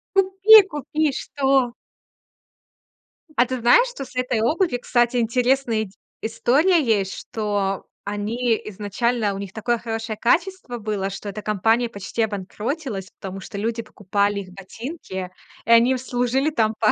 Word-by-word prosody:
Купи 390 +3 +7
купи 300 0 -3
что! 270 -3 +1 1.6
А 245 - +5
ты 255 0 -3
знаешь, 245 - +5
что 275 - -7
с 255 - -16
этой 250 -3 0
обувью, 300 - +1
кстати, 240 0 +2
интересная 240 0 +1
ид 195 - -10 0.3
история 290 +10 +2
есть, 205 -5 +1
что 205 -3 -2 0.2
они 220 +3 -1
изначально 210 +2 -1
у - - -5
них 195 -1 -7
такое 240 +2 0
хорошее 225 -1 -4
качество 335 - 0
было, 205 -3 -2
что 195 +1 -6
эта 200 +1 -6
компания 225 +4 +1
почти 200 +1 -4
обанкротилась, 210 - -4
потому 195 0 -6
что 200 - -8
люди 230 +3 -2
покупали 205 -1 -1
их 185 -1 -12
ботинки, 195 - -7 0.3
и - - -10
они 230 +2 +6
им 260 - +1
служили 255 +3 0
там 225 -6 +1
по 215 -1 +4
230 Hz, 145 wpm, -22 LUFS, 205-255 Hz, 1.6 s, Купи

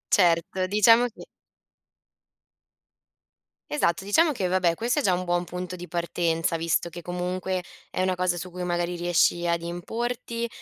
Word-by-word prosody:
Certo, 180 0 +2
diciamo 225 +5 +5
che 230 - -13 2.4
Esatto, 190 - +1
diciamo 300 - +3
che, 195 -8 -1
vabbè, 180 -2 +2
questo 240 - 0
è - - +1
già 190 -9 +2
un 180 +1 -1
buon 175 0 0
punto 180 +1 -5
di 180 0 -8
partenza, 170 -1 -1
visto 165 +1 0
che, 175 +1 -9
comunque, 180 +1 -3 0.3
è - - -2
una 185 0 +1
cosa 180 -1 0
su 180 +2 -6
cui 180 +1 -5
magari 175 0 -1
riesci 175 0 +2
ad 170 0 +1
importi, 230 +7 -3
180 Hz, 155 wpm, -26 LUFS, 175-190 Hz, 2.4 s, diciamo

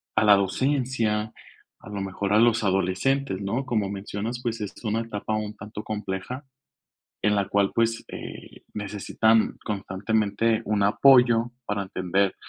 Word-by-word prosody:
a 110 - +3
la 105 -1 +8
docencia, 110 0 0 0.5
a - - -13
lo 100 -1 -4
mejor 100 +1 -2
a 105 - +6
los 115 -1 +4
adolescentes, 95 +6 +1
¿no?, 115 +7 -1
como 105 -6 0
mencionas, 100 +4 -4
pues, 115 -2 -2
es 105 - -4
una 110 0 0
etapa 110 -1 -3
un 105 0 -3
tanto 105 +1 -8
compleja, 105 +5 -5 0.8
en 105 0 +2
la 100 -1 +1
cual, 100 -1 +2
pues, 115 0 0
eh, - - -9
necesitan 105 +2 +1
constantemente 105 +2 0
un 105 -1 +1
apoyo 120 +1 +5
para 100 -2 -1
entender, 95 +1 0
105 Hz, 145 wpm, -25 LUFS, 100-115 Hz, 0.8 s, la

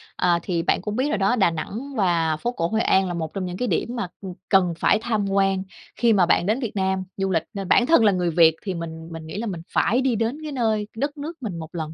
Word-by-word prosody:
Ờ, 175 -1 +2
thì 175 -3 -1
bạn - - +1
cũng 210 +2 -4
biết 265 +4 0
rồi 215 - 0
đó, 195 +5 +2
Đà 195 -7 +3
Nẵng 225 - -6
và 170 -6 +1
phố 240 +10 -2
cổ 165 -9 -1
Hội 220 +3 0
An 190 -3 +3
là 175 - -3
một 160 -2 -4
trong 190 -2 -3
những 180 0 -5
cái 250 - -1
điểm 240 +2 -1
mà, 215 -6 -2
ừm, 190 -2 -6 0.2
cần 185 -3 +4
phải - - +3
tham 220 -4 -1
quan 195 -1 +1 0.3
khi 235 -2 +3
mà 190 -3 +4
bạn 170 0 +2
đến 220 +5 +1
Việt 235 -6 -3
Nam 190 -1 0
du 195 0 -1
lịch, 165 -3 +1
nên 195 -2 -5
bản 245 - +4
thân 320 -7 +5
là 205 - +6
người 180 -2 0
Việt 160 -1 +5
thì 190 - -3
mình 165 -1 -7
mình 160 -1 -8
nghĩ 160 - -6
là 230 +2 -3
mình 180 -5 -4
phải 245 +5 +2
đi 260 -3 +1
đến 230 +5 -1
cái 305 - -5
nơi 220 -5 0
đất 285 +4 -2
nước 315 +4 -6
mình 185 -7 -4
1 160 -1 -7
lần, 160 -2 -4
195 Hz, 280 wpm, -23 LUFS, 170-230 Hz, 0.3 s, là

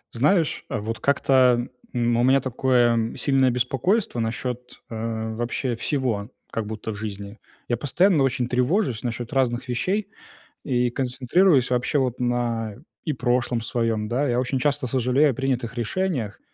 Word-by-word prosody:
Знаешь, 160 +6 +2
э, - - -2
вот 110 +2 -4
как-то, 130 -3 +3 0.2
м, 120 -1 +1
у - - +3
меня 135 +2 +5
такое 120 -3 +1
сильное 135 -2 +3
беспокойство 125 - 0
насчет, 125 +2 -4
э, 110 0 -3
вообще 120 +2 -2
всего 120 -5 -1 0.2
как 110 -2 -3
будто 110 +1 -5
в - - -6
жизни. 100 0 -6 0.3
Я 120 - 0
постоянно 165 - +3
очень 125 -2 0
тревожусь 125 - +1
насчет 120 -1 -4
разных 130 -1 0
вещей 185 - -1 0.5
и 125 -3 +1
концентрируюсь 130 +4 +2
вообще 125 +4 +1
вот 130 -2 -1
на, 120 -3 -1
э, - - -15 0.2
и 155 - -1
прошлом 125 -2 0
своём, 115 -2 -1
да. 130 +6 0
Я 120 -1 +1
очень 130 +1 -1
часто 140 0 0
сожалею 130 +4 +3
о - - 0
принятых 125 -3 -2
решениях 120 - -2
125 Hz, 150 wpm, -24 LUFS, 115-135 Hz, 0.5 s, меня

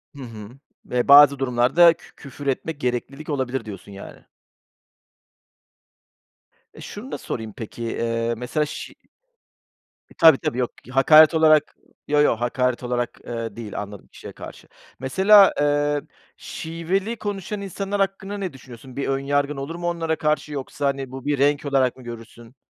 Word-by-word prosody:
Hı 140 - -9
hı, 110 -4 -9 0.4
eee, 125 -1 0
bazı 140 -1 +8
durumlarda 135 +7 +4
kü 165 - -19
küfür 140 0 -10
etmek 140 +3 -2
gereklilik 130 +5 -3
olabilir, 135 -2 -2
diyorsun, 100 -1 -10
yani. 100 0 -12 2.5
E, - - -13
şunu 230 +6 -9
da - - -3
sorayım, 110 -3 -6
peki, 115 +1 -8
eee, 115 0 -2
mesela 135 +5 -1
şi 150 - -8 1.2
E, - - -18
tabii, 160 -5 +7
tabii, 120 - -3
yok 125 -2 -1
k 125 - -12
hakaret 155 +4 +7
olarak, 155 -2 +4 0.3
yo, 150 0 +3
yo, 150 - +3
hakaret 125 +1 -1
olarak, 120 -1 -3
eee, 115 -3 -5
değil 110 -3 -6
anladım 105 -1 -10
kişiye - - -12
karşı. - - -11 0.3
Mesela, 195 +9 +5
eee, 145 0 +1 0.4
şiveli 180 +7 -3
konuşan 205 -1 -5
insanlar 200 +1 -4
hakkında 195 +1 -2
ne 190 -6 -4
düşünüyorsun? 130 -1 -13
Bir 140 - -3
ön 135 0 0
yargın 145 +1 -1
olur 140 +5 -5
mu 175 0 -4
onlara 165 -2 -1
karşı 150 -1 -1
yoksa, 140 +1 -5
hani, 135 -2 -3
bu 130 0 -9
bir 145 -1 0
renk 145 +1 +2
olarak 135 -3 +1
mı 130 - -13
görürsün? 115 +1 -11
140 Hz, 155 wpm, -22 LUFS, 125-160 Hz, 2.5 s, bazı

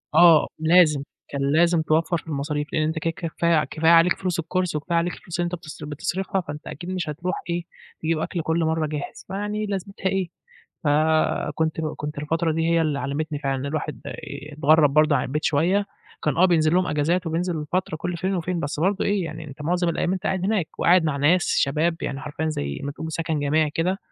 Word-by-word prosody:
آه 165 -3 +7
لازم، 160 -3 +5 0.3
كان 140 -1 -3
لازم 170 +1 +4
توفَّر 160 +2 +1
في 160 - -12
المصاريف، 150 0 -2
لإن 155 - +2
أنت 160 +1 -1
كده 165 - -1
كفاية 165 -2 +1
كفاية 160 +4 +2
عليك 170 +1 +6
فلوس 180 -3 -1
الCourse 180 +1 -1
وكفاية 170 +3 -1
عليك 175 +1 0
الفلوس 175 0 -7
اللي 175 - +2
أنت 175 +1 -2
بتص 160 -2 -10
بتصرفها، 185 +6 -2
فأنت 150 -2 -8
أكيد 175 +5 -7
مش 180 -4 -2
هتروح 175 +5 -3
إيه، 170 0 -1 0.4
تجيب 160 0 0
أكل 170 +1 -2
كلّ 160 +2 0
مَرّة 160 -1 0
جاهز، 150 -1 -6
فيعني 210 +2 -3
لازمتها 195 -1 -5
إيه. 190 -2 -1 0.6
فكنت 155 +1 +1 0.2
كنت 150 0 -5
الفترة 160 +2 0
دي 165 +1 0
هي 165 0 +3
اللي 150 -3 0
علّمتني 145 +2 -3
فعلًا 135 -1 -1
إن 140 - -4
الواحد 150 +1 -3
آآ، - - -4 0.4
اتغرّب 150 0 +4
برضه 155 -1 +5
عن 125 - 0
البيت 150 +4 -3
شوية، 180 +7 +2 0.4
كان 150 -3 0
آه 185 - +5
بينزل 160 -3 +3
لهم 185 0 +3
أجازات 165 +4 0
وبينزل 165 -1 -2
فترة 180 -3 0
كلّ 175 +2 -3
فين 190 +2 -1
وفين، 175 0 -2
بس 145 0 -3
برضه 195 +3 +1
إيه، 200 -3 +1
يعني 160 0 -6
أنت 145 0 -9
معظم 175 +2 +1
الأيام 170 +2 0
أنت 190 0 -3
قاعد 190 -2 -1
هناك، 200 -6 +1
وقاعد 175 0 +5
مع 155 -3 0
ناس 165 +6 +3
شباب 155 +4 +1
يعني 140 0 -3
حرفيًا 155 +1 -3
زي 70 - -3
ما 140 - -3
تقول 160 +2 -6
سكن 160 -1 -1
جماعي 150 +2 +2
كده، 180 +5 0
160 Hz, 205 wpm, -24 LUFS, 150-175 Hz, 0.6 s, آه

